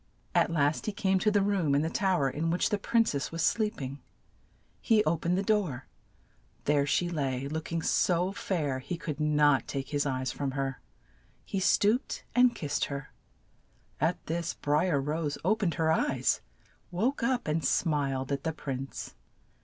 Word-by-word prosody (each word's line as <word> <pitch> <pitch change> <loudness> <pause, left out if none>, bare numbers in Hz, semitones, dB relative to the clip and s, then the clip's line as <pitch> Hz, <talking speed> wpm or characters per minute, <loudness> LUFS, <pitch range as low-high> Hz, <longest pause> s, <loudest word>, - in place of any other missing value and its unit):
At - - +3
last 150 0 +1
he - - +1
came 195 -2 +1
to 215 - +3
the 205 -1 +3
room 190 -8 +1
in 145 - +2
the 160 - 0
tow 190 -4 +1
er 135 - +3
in 160 +4 -1
which 175 +2 +1
the 210 - +1
prin 230 +2 +3
cess 140 -7 -2
was 165 0 -2
sleep 215 -1 +1
ing. 135 +1 -6 0.8
He 220 -3 +4
o 155 - +2
pened 170 +2 0
the 195 - 0
door: 190 - 0 0.8
there 145 -1 +2
she 175 +4 +2
lay, 140 -5 -2
look 155 +2 -5
ing 165 -1 -1
so 180 +2 +2
fair 155 -9 -2
he 170 +7 -5
could 155 -3 -5
not 150 -2 +3
take 135 -1 -4
his 145 -1 0
eyes 130 -1 -1
from 140 -2 -3
her. 135 -1 -2 0.6
He 195 - -2
stooped 210 +6 +2
and 245 0 +5
kissed 145 -2 -1
her; 140 0 -6 0.9
at 165 +4 0
this 165 +1 -2
Bri 150 +5 +1
er 145 -5 +2
Rose 150 +1 -2
o 210 +4 +4
pened 195 -7 -1
her 160 -1 +2
eyes, 130 -5 +1 0.5
woke 225 +11 0
up, 245 -2 0
and 155 +1 0
smiled 140 -5 0
at 140 -1 -1
the 160 - -1
prince. 135 -3 -5
160 Hz, 185 wpm, -29 LUFS, 140-190 Hz, 0.9 s, and